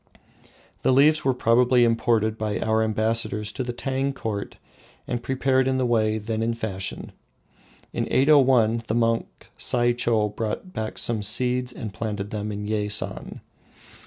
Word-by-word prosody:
The - - +2
leaves 150 +4 +4
were 130 -1 +1
probably 125 +1 +4
imported 115 -1 +2
by 110 -1 -2
our 110 0 +1
ambassadors 110 -1 -1
to 130 - -4
the 125 - -3
Tang 135 +3 -2
Court 105 -6 -5 0.5
and 120 - -2
prepared 130 0 +1
in 130 0 +1
the 130 - +1
way 110 -2 +1
then 110 +1 -3
in 115 +1 0
fashion. 95 -4 -5 0.8
In - - -2
801 130 -5 +4
the 110 - -1
monk 115 -1 -1
Saicho 120 -3 +1
brought 115 - -4
back 110 0 -4
some 115 -3 0
seeds 125 +4 +1
and 110 -4 -7
planted 105 -2 -4
them 105 0 -3
in 105 0 -5
Yeisan. 105 -1 -2
115 Hz, 145 wpm, -24 LUFS, 110-125 Hz, 0.8 s, leaves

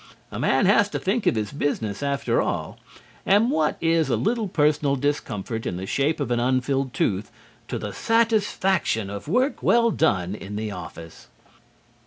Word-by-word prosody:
A - - -5
man 135 - +2
has 205 +1 +4
to - - -3
think 205 +4 -1
of - - +3
his 105 -2 -2
business, 115 -8 -2
after 140 -1 0
all, - - -3 0.4
and 210 +6 +3
what 155 -1 +1
is 165 -1 +2
a - - +2
little 225 0 0
personal 150 -4 +2
discomfort 120 -6 -3
in 90 - -3
the 95 - -5
shape 140 +9 0
of 125 - -2
an 120 - +2
unfilled 130 +2 0
tooth 105 -5 -1 0.4
to - - -3
the - - -5
satisfaction 200 - +1
of 100 +4 -7
work 255 - +1
well 235 0 +4
done 95 - +1
in 105 -1 -7
the 105 0 -3
office? 85 -4 -10
140 Hz, 170 wpm, -24 LUFS, -, 0.4 s, has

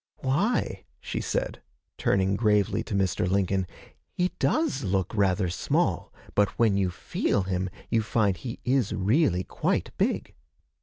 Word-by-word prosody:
'Why,' 135 - 0
she - - -4
said, - - -2 0.3
turning 95 0 +1
gravely 105 -1 +2
to 100 - -3
Mr. 95 -2 +1
Lincoln, 95 -1 +1 0.5
'he 180 0 +1
does 310 - +1
look 95 -1 0
rather 100 -2 +2
small, 85 - 0 0.2
but 105 0 +1
when 110 -4 +3
you 95 -2 +1
feel 95 +2 -1
him, 95 0 -1 0.2
you 115 -1 +3
find 105 -3 +1
he 115 +7 -6
is 125 -5 +2
really 105 - +2
quite - - -1
big.' - - 0
100 Hz, 140 wpm, -27 LUFS, 95-115 Hz, 0.5 s, when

